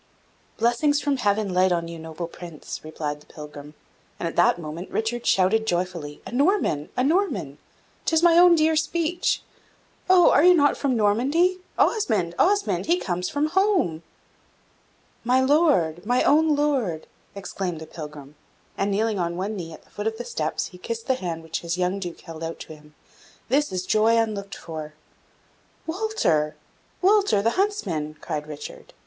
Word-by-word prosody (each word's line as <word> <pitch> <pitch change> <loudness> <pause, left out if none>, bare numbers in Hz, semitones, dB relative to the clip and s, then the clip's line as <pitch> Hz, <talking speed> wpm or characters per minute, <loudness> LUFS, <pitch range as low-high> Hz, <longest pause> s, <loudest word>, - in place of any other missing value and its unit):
"Blessings 245 +6 +2
from 285 -2 0
Heaven 205 -4 0
light 185 +1 +3
on 170 -1 0
you, 165 0 -8
noble 160 +1 -6
Prince," 170 -2 -9
replied 150 -1 -4
the - - -21
pilgrim, 150 -1 -11 0.4
and 170 - -2
at 165 - -5
that 175 - +4
moment 165 +2 -7
Richard 235 +2 -2
shouted 220 +4 +3
joyfully, 175 -5 -3
"A - - -8
Norman, 275 - +1
a 250 - +2
Norman! 265 - 0 0.5
'tis 325 0 +2
my 340 -1 +6
own 350 0 +7
dear 315 0 +3
speech! 335 +2 0 0.7
Oh, 365 -2 +7
are 285 - +5
you 360 +1 +7
not 290 -3 +4
from 265 -4 0
Normandy? 275 - +2 0.2
Osmond, 210 - +1
Osmond! 405 +2 +2
he 345 +2 +3
comes 180 - -2
from 295 +2 0
home!" 360 - +1 1.2
"My 250 +2 +3
Lord! 260 - +3
my 245 +4 +2
own 310 +1 +4
Lord!" 260 - 0 0.3
exclaimed 185 -3 -4
the 160 - -8
pilgrim, 150 -3 -9 0.5
and, 200 - +1
kneeling 210 0 0
on 170 0 -2
one 200 +4 -3
knee 170 -4 -6
at 160 - -12
the - - -27
foot 205 +1 -4
of 220 0 -2
the 240 - -6
steps, 160 -10 -2
he 180 - -14
kissed 230 +3 -5
the 265 - +2
hand 170 -9 -4
which 160 0 -4
his 170 +1 -3
young 185 +2 0
Duke 175 -3 -6
held 165 -1 -9
out 165 0 -5
to - - -9
him 150 0 -19 0.5
"This 290 +4 +2
is 185 0 -3
joy 220 +3 +3
unlooked 210 -3 -2
for!" 155 -2 -8 0.9
"Walter! 325 - 0 0.5
Walter, 395 - +4
the 230 - +3
huntsman!" 195 - -1
cried 150 0 -4
Richard. 150 -1 -9
205 Hz, 165 wpm, -24 LUFS, -, 1.2 s, own